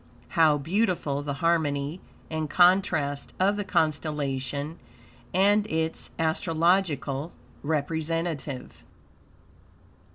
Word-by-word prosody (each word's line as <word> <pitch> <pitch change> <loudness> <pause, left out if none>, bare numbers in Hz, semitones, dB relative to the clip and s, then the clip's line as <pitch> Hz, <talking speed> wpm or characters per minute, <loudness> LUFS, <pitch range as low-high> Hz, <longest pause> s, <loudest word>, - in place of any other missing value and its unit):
How 155 -3 +4
beautiful 165 -3 0
the 145 -1 -3
harmony 155 -1 +1 0.3
and 155 -1 -2
contrast 175 -6 +3
of 195 +2 +3
the 205 - -2
constellation 145 -3 -1 0.5
and 205 +3 +3
its 160 -3 -1
astrological 160 -2 +1 0.3
representative. 160 -1 -3
160 Hz, 75 wpm, -27 LUFS, 145-175 Hz, 0.5 s, How